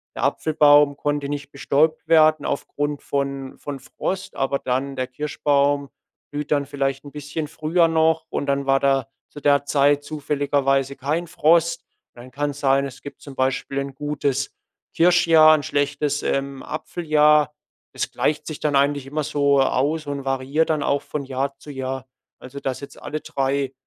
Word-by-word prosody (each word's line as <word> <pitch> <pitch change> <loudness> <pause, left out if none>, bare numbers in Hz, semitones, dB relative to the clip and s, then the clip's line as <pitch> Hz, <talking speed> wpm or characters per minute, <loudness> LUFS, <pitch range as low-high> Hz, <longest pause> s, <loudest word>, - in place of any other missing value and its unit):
der - - -4
Apfelbaum 145 -2 +4
konnte 145 -1 -1
nicht 145 -1 -5
bestäubt 155 +3 +1
werden 155 -1 +5
aufgrund 145 +1 -3
von 140 -1 -3
von 145 -2 -6
Frost, 190 +8 -5
aber 135 +1 0
dann 130 +2 -2
der 130 -1 -2
Kirschbaum 140 +1 0 0.4
blüht 145 0 -5
dann 145 -1 +2
vielleicht 135 -1 -2
'n 145 - -9
bisschen 150 +2 -5
früher 165 +3 +1
noch 160 0 +2
und - - -2
dann 140 0 0
war 135 0 +4
da 135 -3 +1 0.2
zu - - -10
der 140 0 +3
Zeit 145 0 +3
zufälligerweise 140 -2 0
kein 150 +6 -2
Frost. 170 0 +2 0.3
Dann 120 +1 -12
kann's 145 +1 -3
sein 135 -1 +2
es 135 -2 -9
gibt 140 - -10
zum 140 - -10
Beispiel 135 +1 -1
'n 140 -1 -5
gutes 140 -1 -2 0.4
Kirschjahr, 165 -2 +6
'n 145 - -5
schlechtes, 145 0 -1
ähm, 140 -1 -2
Apfeljahr. 150 -2 +2 0.4
Das - - -3
gleicht 150 - -1
sich 155 - -6
dann 150 -2 0
eigentlich 140 0 +2
immer 150 +2 -2
so 140 -1 +2
aus 145 +4 0
und 140 -1 -4
variiert 135 +4 0
dann 155 -2 +1
auch 140 - +1
von 150 - -5
Jahr 135 +1 -3
zu 145 - -11
Jahr. 130 -1 -4 0.3
Also 130 +2 -9
dass 135 -2 -3
jetzt 140 -1 -11
alle 155 0 -5
3- 135 0 -1
145 Hz, 165 wpm, -22 LUFS, 135-150 Hz, 0.4 s, Kirschjahr